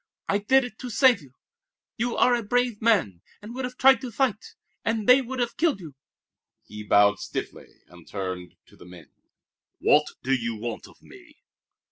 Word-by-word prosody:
"I 200 - +1
did 265 +6 +3
it 245 -3 -9
to 250 - -6
save 245 -4 +4
you. 135 -2 -18 0.6
You 240 0 -2
are 250 - +4
a 240 - +1
brave 245 0 -1
man, 190 - +1 0.2
and 210 +3 -10
would 255 +1 -4
have 250 0 -8
tried 265 0 +5
to 255 - -5
fight, 235 -2 -2 0.3
and 225 -2 -2
they 255 +2 +7
would 260 +1 -6
have 240 -1 -2
killed 315 -8 +1
you!" 160 -6 -10 0.7
He 105 - -9
bowed 105 -1 +3
stiffly - - -7
and 90 -1 -18
turned 95 -3 -6
to - - -21
the - - -15
men. 90 -2 -14 0.7
"What - - +3 0.2
do 135 - 0
you 120 -3 -1
want 115 +1 -6
of - - -21
me?" - - -17
215 Hz, 185 wpm, -25 LUFS, -, 0.7 s, they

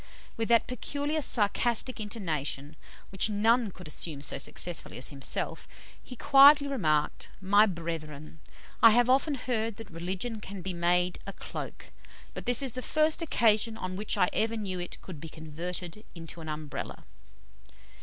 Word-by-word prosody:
With 225 -1 -2
that 235 -1 +4
peculiar 285 +5 -2
sarcastic 240 +1 +1
intonation 155 - -3 0.4
which 195 +2 +1
none 225 +2 +2
could 180 -2 -11
assume 150 -1 -3
so 140 - 0
successfully 170 +4 +1
as 125 - 0
himself, 140 -1 -2 0.4
he 250 - -10
quietly 280 +3 +7
remarked, 155 - 0
"My 205 +3 +5
brethren, 160 -4 -6 0.4
I 230 - +10
have 245 +3 +4
often 275 +3 +2
heard 230 -4 -2
that 225 -3 -11
religion 185 +7 -4
can 195 -3 -8
be 185 0 -3
made 175 +1 +1
a 195 - -5
cloak, - - -8 0.4
but - - -8
this 245 +2 +3
is 265 - -1
the 255 - -6
first 310 +4 +1
occasion 225 -7 +2
on 185 -3 -5
which 210 +3 -1
I 180 - +3
ever 225 +1 +1
knew 190 -4 -4
it 175 - -6
could 165 -6 -9
be 165 - -7
converted 170 +5 -6
into 165 0 -7
an 160 - -7
Umbrella." 150 -1 -6
200 Hz, 155 wpm, -29 LUFS, 165-235 Hz, 0.4 s, I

